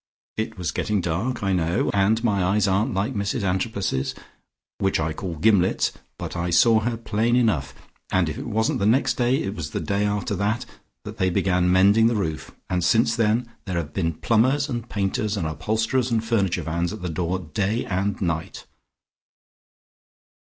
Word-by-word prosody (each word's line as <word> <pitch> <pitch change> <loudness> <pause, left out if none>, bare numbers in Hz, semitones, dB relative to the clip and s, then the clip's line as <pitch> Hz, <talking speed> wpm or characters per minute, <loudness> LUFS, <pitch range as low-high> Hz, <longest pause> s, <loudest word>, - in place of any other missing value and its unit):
It 110 -1 -3
was 90 -2 -2
getting 105 -1 -1
dark, 95 +8 -2
I 95 -1 +1
know, 85 0 +1
and 105 +3 +2
my 100 -5 +2
eyes 100 +2 +2
aren't 95 +2 +1
like 100 +7 0
Mrs 100 +1 -2
Antrobus's, 95 - -1 0.6
which 95 -3 +1
I 80 0 -1
call 85 +1 -5
gimlets, 95 +1 +3 0.3
but - - -6
I 85 0 -2
saw 110 +7 +5
her 115 +1 -2
plain 115 +1 0
enough. 110 - +1 0.4
And 95 -3 +2
if 75 - -3
it - - -6
wasn't 110 0 0
the 100 - +2
next 130 +3 +3
day, 125 +2 +1
it 95 - -3
was 80 -6 -5
the - - -3
day 100 -1 -1
after 105 0 -1
that, 105 +5 -1 0.4
that - - -8
they 95 - +2
began 90 0 +1
mending 100 +5 +5
the 115 - +1
roof, 80 -7 -3 0.2
and 90 -1 -1
since 115 +3 +3
then, 115 +1 +1 0.2
there 90 -3 -3
have 75 -3 -4
been 85 -4 0
plumbers 130 - +2
and 120 -2 -4
painters 105 +1 -1
and 85 - -2
upholsterers 110 - 0
and 115 -1 0
furniture 95 -7 0
vans 85 +3 -1
at 105 -3 -7
the - - -1
door 85 +2 -1
day 100 +6 -2
and 100 +1 -1
night." 85 -3 -3
100 Hz, 180 wpm, -24 LUFS, 90-110 Hz, 0.6 s, saw